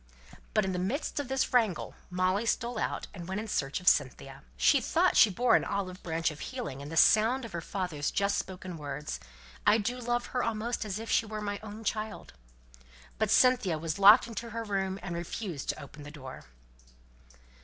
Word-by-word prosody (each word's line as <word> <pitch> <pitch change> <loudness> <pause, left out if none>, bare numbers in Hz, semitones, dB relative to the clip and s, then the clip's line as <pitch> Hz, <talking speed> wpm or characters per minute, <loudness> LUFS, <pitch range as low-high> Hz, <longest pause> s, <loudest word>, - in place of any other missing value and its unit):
But 215 -2 +3
in 190 - -1
the 180 - -2
midst 240 - -2
of 285 - -3
this 265 0 -1
wrangle 225 -7 +1 0.2
Molly 185 +4 0
stole 235 +2 -1
out, - - -2
and 175 -3 -8
went 190 +2 -2
in 220 - -5
search 140 -9 -1
of 180 - -14
Cynthia. 135 -4 +2 0.2
She - - +4
thought - - +2
she 220 - +7
bore 235 +5 +3
an - - +3
olive 185 -2 -3
branch 165 -1 -1
of 150 - -11
healing 140 -1 -5
in 140 - -7
the 165 - -5
sound 230 +7 +5
of 230 - -9
her 170 - -4
father's 165 -5 -3
just 200 0 +1
spoken 185 -2 -6
words: 150 0 -5 0.4
"I 210 +1 +5
do 245 +4 -2
love 240 0 -1
her 250 - +1
almost 230 +1 -2
as 205 -2 -3
if 225 +1 -5
she 225 - +2
were 215 0 -5
my 205 -1 -3
own 215 +1 -9
child." 215 0 -4 0.9
But - - +1
Cynthia 250 -10 +4
was 160 +2 -3
locked 200 +2 +8
into 230 0 -6
her 230 +1 -4
room, 195 -2 -2
and 175 - -4
refused 170 -2 -5
to - - -1
open 145 +2 -12
the 145 - -9
door. 135 -4 -10
200 Hz, 200 wpm, -30 LUFS, 170-225 Hz, 0.9 s, locked